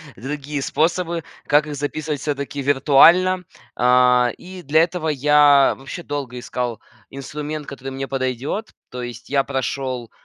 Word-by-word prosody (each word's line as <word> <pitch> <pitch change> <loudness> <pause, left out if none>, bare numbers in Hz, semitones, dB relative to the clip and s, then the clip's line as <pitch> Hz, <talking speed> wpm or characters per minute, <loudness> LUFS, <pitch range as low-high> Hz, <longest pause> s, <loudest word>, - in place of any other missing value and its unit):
другие 145 +2 -5
способы, 165 +2 0 0.2
как 150 +1 +4
их 150 - -5
записывать 145 +1 -3
всё-таки 140 -1 -3
виртуально. 165 +7 +5 0.3
А, 125 0 +4
и 185 0 -10
для 155 +3 +4
этого 170 -1 -3
я 145 -1 +5
вообще 135 +6 -8
долго 140 -4 -5
искал 120 -2 -4 0.3
инструмент, 150 +2 -6
который 135 -1 -7
мне 135 +1 -5
подойдет, 135 - -3 0.2
то 125 - -7
есть 120 0 -8
я 140 -1 +2
прошел 130 -3 -3
140 Hz, 135 wpm, -21 LUFS, 130-150 Hz, 0.3 s, виртуально